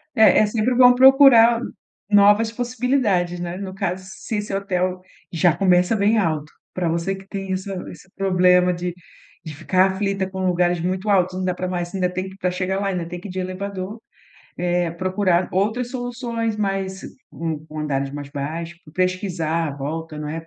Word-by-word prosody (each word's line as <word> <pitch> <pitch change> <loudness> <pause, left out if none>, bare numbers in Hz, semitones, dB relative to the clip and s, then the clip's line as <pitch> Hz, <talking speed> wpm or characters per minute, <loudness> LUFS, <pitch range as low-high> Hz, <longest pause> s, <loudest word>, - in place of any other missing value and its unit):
É, 220 -3 +6
é 215 - +4
sempre 230 +3 0
bom 250 0 +7
procurar 255 -3 +7 0.5
novas 205 +2 +5
possibilidades, 240 -7 0
né, 175 0 -4
no 190 -1 -6
caso, 185 0 -3
se 190 +3 -6
esse 210 -1 -4
hotel 185 -2 -1 0.3
já 170 -1 +2
começa 180 +1 +3
bem 210 +3 +2
alto 155 -6 -1 0.2
pra 180 -2 -1
você 170 +4 -1
que 190 0 -11
tem 195 -2 -5
essa 190 +1 -3 0.2
esse 190 - -14
problema 180 -1 +3
de 175 0 -4 0.5
de 155 - -7
ficar 185 +5 +2
aflita 195 -1 -2
com 190 0 -3
lugares 175 0 +1
muito 185 +3 -2
altos, 185 -2 +2
não 185 - -2
dá 180 - 0
para 185 - -4
mais 175 0 -4
ainda 180 -2 0
tem 185 +1 -3
que 190 - -12
pra 180 -2 0
chegar 185 +1 -2
lá, 200 - -1
ainda 180 -3 -2
tem 180 - -6
que - - -9
ir - - -8
de 185 - -6
elevador, 190 +3 -5 0.6
eh, 175 -1 0
procurar 185 0 0
outras 220 +6 0
soluções, 240 -3 -3
mas 195 -2 -2 0.3
com 160 -2 -4
com 155 0 -9
andares 140 -2 -2
mais 145 -1 -7
baixos, 165 +4 -5 0.2
pesquisar 180 -3 -1
à 140 - -7
volta, 155 +3 -5
não 150 0 -5
é, 165 +2 -6
185 Hz, 185 wpm, -21 LUFS, 175-205 Hz, 0.6 s, bom